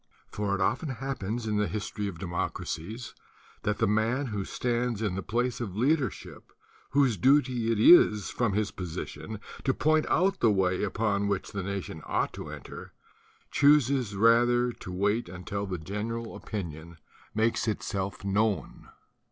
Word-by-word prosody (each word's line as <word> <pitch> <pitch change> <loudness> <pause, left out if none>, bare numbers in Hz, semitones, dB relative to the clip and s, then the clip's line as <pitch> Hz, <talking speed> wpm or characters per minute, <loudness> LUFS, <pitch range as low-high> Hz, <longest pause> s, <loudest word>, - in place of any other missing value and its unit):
"For 100 -1 -1
it 100 - -3
often 120 - 0
happens 120 -4 -3
in 105 -1 0
the 105 0 +1
history 105 -1 -3
of 95 -4 -6
democracies 90 +4 -4 0.5
that 105 -1 -1
the - - +2
man 110 +7 +1
who 105 -5 -3
stands 120 -2 -1
in 105 -4 -1
the 95 - -3
place 120 +6 -1
of 100 -6 -4
leadership, 135 - -1 0.4
whose 135 -6 +3
duty 125 0 +3
it 110 - 0
is 105 - +6
from 120 -5 0
his: 105 0 0
'>n 90 +4 -6 0.2
to 135 - +2
point 155 0 +2
out 190 +3 +2
the 115 - +4
way 95 -3 +2
upon 100 0 0
which 100 -2 -2
the 100 - -3
nation 95 -4 -5
ought - - 0
to - - -7
enter, - - -9 0.6
chooses 140 -6 +4
rather 120 +3 +4
to 90 - -9
wait 105 +3 0
until 100 +3 -4
the 95 -1 -3
general 110 +7 -4
opinion 85 -5 -6 0.4
ma' 110 - +2 0.2
If 100 -2 -3
known. 100 +1 -1
105 Hz, 150 wpm, -28 LUFS, 100-120 Hz, 0.6 s, is